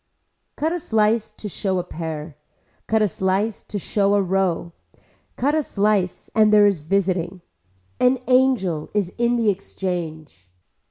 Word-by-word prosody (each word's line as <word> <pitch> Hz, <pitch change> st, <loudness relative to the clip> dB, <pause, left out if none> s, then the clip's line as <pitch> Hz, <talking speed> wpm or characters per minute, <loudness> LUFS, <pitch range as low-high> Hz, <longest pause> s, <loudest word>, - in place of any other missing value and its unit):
Cut 315 Hz, +2 st, -1 dB
a 350 Hz, -, -2 dB
slice 220 Hz, -4 st, +1 dB
to 215 Hz, -, -7 dB
show 190 Hz, -1 st, -2 dB
a 180 Hz, -, -1 dB
pear, 160 Hz, -3 st, -6 dB, 0.5 s
cut 220 Hz, -1 st, +2 dB
a -, -, +3 dB
slice 195 Hz, +4 st, -1 dB
to 205 Hz, -, -4 dB
show 200 Hz, +1 st, +1 dB
a 200 Hz, -, +3 dB
row, 180 Hz, -2 st, 0 dB, 0.6 s
cut 285 Hz, +4 st, +1 dB
a 310 Hz, -, +2 dB
slice 200 Hz, -, 0 dB
and 215 Hz, -1 st, +4 dB
there 210 Hz, -1 st, +7 dB
is 200 Hz, -5 st, +2 dB
visiting. 180 Hz, +1 st, -1 dB, 0.6 s
An 250 Hz, +1 st, +4 dB
angel 250 Hz, -12 st, +2 dB
is 200 Hz, -4 st, +1 dB
in 240 Hz, 0 st, +2 dB
the 230 Hz, -3 st, +2 dB
exchange. 165 Hz, -, -6 dB
200 Hz, 150 wpm, -22 LUFS, 175-220 Hz, 0.6 s, there